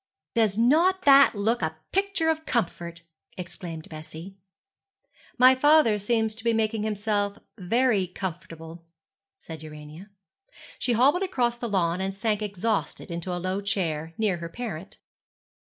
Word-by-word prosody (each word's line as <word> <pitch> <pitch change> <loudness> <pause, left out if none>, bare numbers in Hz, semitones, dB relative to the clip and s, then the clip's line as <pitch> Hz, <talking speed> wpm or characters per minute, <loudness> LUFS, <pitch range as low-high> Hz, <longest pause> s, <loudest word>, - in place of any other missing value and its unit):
'Does 220 -4 +2
not 335 +11 +3
that 275 -3 +7
look 220 +3 0
a 160 -1 -2
picture 390 -4 0
of 315 0 -4
comfort?' 170 -6 -2 0.3
exclaimed 170 -3 -8
Bessie. 160 +4 -10 1.0
'My 255 +1 +7
father 260 -5 +4
seems 220 +1 0
to 225 +1 -10
be 230 -1 +2
making 220 -1 0
himself 205 -1 -1 0.2
very 210 0 +2
comfortable,' 170 -2 -7 0.5
said 160 -2 -10
Urania. 155 +4 -11 0.7
She 245 - 0
hobbled 275 +10 +4
across 245 -11 0
the 235 - -3
lawn, 180 -2 0
and 195 0 -3
sank 215 0 0
exhausted 210 -1 -2
into 170 +2 -4
a 180 - -2
low 185 +3 -2
chair, 165 -5 -2
near 210 -5 +1
her 170 0 -6
parent. 205 -4 -7
205 Hz, 135 wpm, -26 LUFS, 170-235 Hz, 1.0 s, that